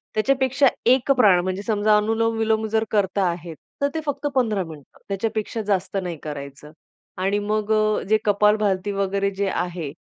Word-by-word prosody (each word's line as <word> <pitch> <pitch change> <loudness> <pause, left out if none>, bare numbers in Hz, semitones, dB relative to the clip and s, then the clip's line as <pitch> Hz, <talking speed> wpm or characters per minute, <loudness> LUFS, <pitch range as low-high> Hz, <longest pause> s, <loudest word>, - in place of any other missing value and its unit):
त्याच्यापेक्षा 265 +4 +2 0.2
एक 255 +3 +4
प्राण 200 -7 +6
म्हणजे 185 +1 -3
समजा 215 -1 +3
अनुलोम 225 +2 0
विलोम 220 0 +1
जर 220 +1 +1
करता 200 -2 +1
आहेत 170 -1 -6 0.3
तर 280 - +3
ते 320 - -2
फक्त 285 0 -2
15 220 -6 +1
मिनिटं. 155 -4 -13
त्याच्यापेक्षा 215 +2 -2
जास्त 190 0 -1
नाही 175 -3 -5
करायचं 145 0 -8 0.5
आणि 195 +2 +1
मग 210 +1 -2
अ, 215 0 +2
जे 215 - +5
कपालभाती 205 -1 +2
वगैरे 200 0 -1
जे 200 - +1
आहे, 175 -5 -3
205 Hz, 160 wpm, -23 LUFS, 185-220 Hz, 0.5 s, प्राण